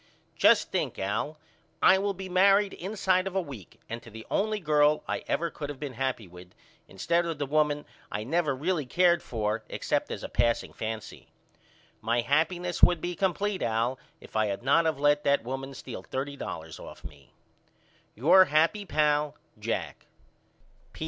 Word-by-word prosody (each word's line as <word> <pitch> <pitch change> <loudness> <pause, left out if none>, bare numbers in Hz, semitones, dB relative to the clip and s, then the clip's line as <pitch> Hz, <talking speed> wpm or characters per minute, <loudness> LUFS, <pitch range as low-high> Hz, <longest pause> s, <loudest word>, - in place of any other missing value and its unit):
Just - - +4
think - - -1
Al 105 +11 -2 0.4
I 190 - +6
will 200 0 -1
be 190 +1 -7
married 195 +2 +4
inside 190 -1 0
of 190 - -6
a - - +3
week 135 - -9
and 115 +1 -6
to 115 - -13
the 110 0 -10
only 215 +1 0
girl 150 -3 +3
I - - -2
ever 170 0 0
could 145 -2 -6
of 145 -2 -7
been 145 -3 -5
happy 125 -4 -2
with 90 +1 -14 0.3
instead 170 - 0
of 165 -3 -3
the 145 - -2
woman 150 0 +1 0.3
I 105 - -3
never 150 +2 0
really 155 0 -1
cared 175 +4 +3
for 110 -1 -2
except - - -1
as - - -5
a - - -3
passing 115 -1 0
fancy. 110 -1 -6 0.7
My 115 +2 +1
happyness 170 +7 0
would 175 - +6
be 175 +2 -3
complete 195 +1 -1
Al 115 +3 0 0.2
if - - -16
I 110 -1 +2
had 100 +3 -4
not 160 +5 +4
of 155 -3 -1
let 145 +1 +3
that 140 -3 +2
woman 135 +2 -5
steal - - -7
thirty 140 +2 -4
dollars 80 - -7
off - - -11
of 80 - -6
me. 70 -2 -21 0.8
Your 175 - +6
happy 165 +7 +2
pal, 150 -2 +1 0.2
JACK. - - -4
145 Hz, 175 wpm, -28 LUFS, 120-175 Hz, 0.8 s, I